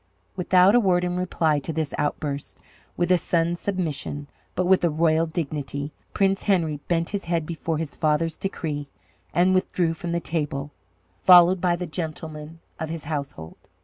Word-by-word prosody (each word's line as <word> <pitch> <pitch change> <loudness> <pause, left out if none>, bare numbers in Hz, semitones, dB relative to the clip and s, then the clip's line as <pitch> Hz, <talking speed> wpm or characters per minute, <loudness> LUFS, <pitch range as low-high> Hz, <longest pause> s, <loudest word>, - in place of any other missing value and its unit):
Without 185 +1 +5
a 245 - +6
word 180 -5 +2
in 180 0 -1
reply 165 -4 +1
to 145 - -5
this 160 -2 -2
outburst, 145 -1 -3 0.4
with 175 +1 +1
a 180 - +5
son's 170 +1 0
submission, 155 -6 -3 0.3
but 185 - +1
with 185 0 +4
a 170 - +4
royal 160 +1 +2
dignity, 145 -3 -4 0.2
Prince 195 -1 +1
Henry 170 -7 +2
bent 165 -1 0
his 200 -1 -4
head 170 -2 0
before 165 0 -3
his 155 -2 -4
father's 155 +1 +1
decree 150 -7 -4 0.4
and 180 +2 +3
withdrew 180 -2 +1
from 170 +1 -5
the 170 - 0
table, 150 -4 -3 0.5
followed 180 0 +7
by 180 -1 +2
the 180 +1 -4
gentlemen 160 -1 -6 0.2
of 160 - -3
his 165 -1 -5
household. 140 - -5
165 Hz, 165 wpm, -24 LUFS, 150-180 Hz, 0.5 s, followed